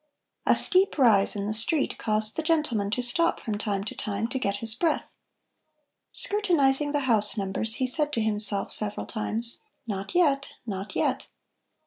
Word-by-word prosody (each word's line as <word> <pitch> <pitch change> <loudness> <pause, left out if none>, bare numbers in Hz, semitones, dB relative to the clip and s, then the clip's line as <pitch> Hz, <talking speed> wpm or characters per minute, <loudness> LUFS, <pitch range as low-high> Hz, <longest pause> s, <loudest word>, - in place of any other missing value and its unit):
A - - +5
steep 370 -1 +3
rise 220 -8 +4
in 200 -1 -3
the 210 - -2
street 250 +8 +1
caused 215 0 0
the - - -1
gentleman 300 -11 0
to 245 +4 -1
stop 335 +8 +1
from 210 -3 -4
time 200 -2 -2
to 210 - -5
time 210 +2 -3
to 265 - -3
get 200 -5 -1
his 225 +2 -1
breath. 315 +6 -1 1.0
Scrutinizing 295 -9 +2
the 290 -1 0
house 225 -4 +1
numbers, 205 +3 -2
he 260 - -1
said 295 +3 +1
to 230 - 0
himself 210 -2 -1
several 210 -1 -2
times: 230 +1 -3 0.3
"Not 200 - -5
yet, 280 -6 +2
not 195 -2 -5
yet." - - -1
225 Hz, 165 wpm, -26 LUFS, 210-285 Hz, 1.0 s, A